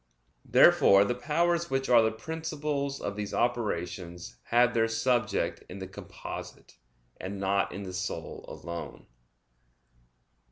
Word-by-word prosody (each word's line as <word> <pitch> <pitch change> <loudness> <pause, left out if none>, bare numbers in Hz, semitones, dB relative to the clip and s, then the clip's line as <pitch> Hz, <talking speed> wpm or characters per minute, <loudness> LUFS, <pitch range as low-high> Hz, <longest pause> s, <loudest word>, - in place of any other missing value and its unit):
Therefore 100 0 +6
the 120 - 0
powers 170 +7 0
which 135 0 0
are 120 -2 +7
the 110 0 +2
principles 150 +1 -3
of 100 - -4
these 105 -1 -4
operations 90 - -2
have 120 +1 +4
their 115 -1 +3
subject 120 +2 0
in 90 - -7
the 95 - -5
composite, 95 - -9 0.4
and 95 +1 -6
not 100 0 +1
in 100 - -6
the 95 -1 -7
soul 95 - -4
alone. 85 -1 -7
115 Hz, 125 wpm, -29 LUFS, 95-135 Hz, 0.4 s, are